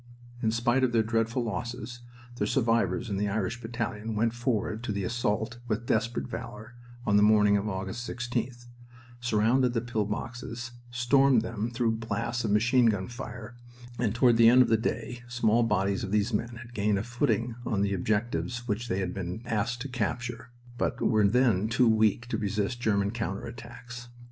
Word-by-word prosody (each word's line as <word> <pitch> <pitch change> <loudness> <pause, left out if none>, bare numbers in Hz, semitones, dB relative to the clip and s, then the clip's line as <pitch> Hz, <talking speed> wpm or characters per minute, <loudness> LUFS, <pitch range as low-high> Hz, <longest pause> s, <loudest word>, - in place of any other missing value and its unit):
In 110 - +2
spite 120 +3 +2
of 125 -2 +2
their 115 -1 +4
dreadful 115 +2 0
losses 120 +1 -5 0.4
the - - 0
survivors 115 -4 +1
in 100 -3 -2
the 105 +1 0
Irish 110 +3 -2
battalion 115 -2 -4
went 115 +2 +1
forward 115 -3 -1
to 115 - -2
the 100 -1 -2
assault 115 +1 -1
with 110 0 -2
desperate 115 0 0
valor 110 +3 -7 0.3
on 100 - +4
the - - +5
morning 105 -1 +5
of 100 +1 0
August 95 +5 -4
16th, 120 0 -3 0.5
surrounded 120 +2 +2
the 115 - +1
pill 115 -3 -1
boxes, 120 +2 -5 0.2
stormed 125 0 +4
them 115 0 -3
through 115 -1 0
blasts 115 +1 -2
of 110 - -1
machine 120 +4 +4
gun 100 -4 0
fire, 120 -2 -8 0.4
and 115 -3 0
toward 120 -1 +4
the 115 0 +8
end 125 +2 +7
of - - -2
the 115 - +5
day 115 +2 -3
small 120 -1 +2
bodies 100 -3 +1
of 95 - -3
these 105 +1 +1
men 120 0 -2
had 120 0 -14
gained 105 -2 +1
a 95 - -1
footing 120 -1 0
on 100 -4 0
the 100 0 0
objectives 120 +5 -1
which 115 +2 -2
they 95 -2 -1
had 90 -1 -2
been 90 +4 -5
asked 115 +1 -1
to 140 - -3
capture, 120 -1 -3 0.3
but - - -1
were 110 -3 +3
then 110 -3 +3
too 120 +1 +3
weak 110 0 +3
to 110 -3 -2
resist 105 +3 -2
German 100 -3 +1
counter 115 -4 -3
attacks. 120 +1 -9
115 Hz, 185 wpm, -28 LUFS, 105-120 Hz, 0.5 s, the